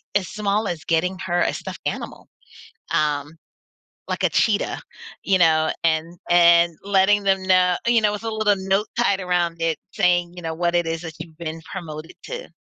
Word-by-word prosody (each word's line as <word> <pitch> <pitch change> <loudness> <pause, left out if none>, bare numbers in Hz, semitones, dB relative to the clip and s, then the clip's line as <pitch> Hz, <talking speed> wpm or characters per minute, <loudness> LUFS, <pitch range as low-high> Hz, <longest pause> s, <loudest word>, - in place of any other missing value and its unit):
as 190 -3 +1
small 210 0 -1
as 165 -3 -4
getting 180 +3 0
her 175 -1 -1
a - - +1
stuffed - - -7
animal, - - -5 0.7
um, 150 -1 0 0.7
like - - -3
a - - +4
cheetah, 215 -2 +1 0.4
you 190 -2 +2
know, 160 -2 +4
and 165 +1 0
and 170 -1 +5
letting 200 +1 +3
them 195 -1 +2
know 185 -1 +4
you 235 -1 +5
know, 210 -1 +3
with 210 - -6
a 225 - -1
little 215 -1 +2
note 195 +3 +2
tied 200 -5 +2
around 175 -2 0
it 165 -2 0 0.2
saying, 175 -1 +2
you 175 - -9
know, 160 0 -3
what 175 +1 0
it 175 -1 +2
is 165 0 -2
that 165 -2 -8
you've 160 -1 -9
been 165 -1 -5
promoted 160 -3 -7
to. - - -6
175 Hz, 185 wpm, -22 LUFS, 165-195 Hz, 0.7 s, and